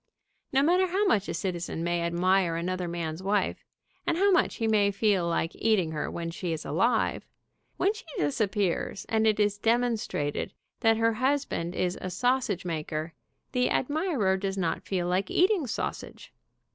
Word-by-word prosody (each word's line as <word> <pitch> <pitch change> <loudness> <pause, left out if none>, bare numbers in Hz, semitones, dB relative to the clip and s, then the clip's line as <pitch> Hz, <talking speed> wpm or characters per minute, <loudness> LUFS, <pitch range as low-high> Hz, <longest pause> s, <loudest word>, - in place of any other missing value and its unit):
No 270 +1 +3
matter 360 +4 +4
how 385 +4 +1
much 210 - +2
a - - -1
citizen 175 -3 -3
may 175 0 0
admire 175 +1 +2
another 180 +1 -2
man's 170 -1 -4
wife, 200 +2 0 0.4
and 330 - +1
how 400 +2 +4
much 365 - +3
he 225 - -1
may 210 -2 +4
feel 200 -3 +1
like 165 0 0
eating 205 -8 +1
her 155 -1 -3
when 165 -1 -4
she 175 0 -4
is 160 - -4
alive, 225 +8 +1 0.5
when 395 +3 +2
she 435 - -10
dis 145 +6 0
appears, 195 -2 -1
and 220 0 +2
it 215 -1 +2
is 205 -1 +2
demonstrated 225 -10 0 0.3
that 225 0 +4
her 230 0 +2
husband 255 -8 -1
is 180 0 -1
a 185 - -3
sausage 230 -2 0
maker, 155 -1 -3 0.4
the 250 0 +1
admirer 280 - +1
does 195 0 -3
not 175 -4 -1
feel 180 -3 -1
like 185 +2 +1
"To - - -7
Ella, - - -2
from - - +6
Adolph." 395 - +1
eating 350 -11 0
sausage. 225 - -5
195 Hz, 185 wpm, -28 LUFS, 175-240 Hz, 0.5 s, from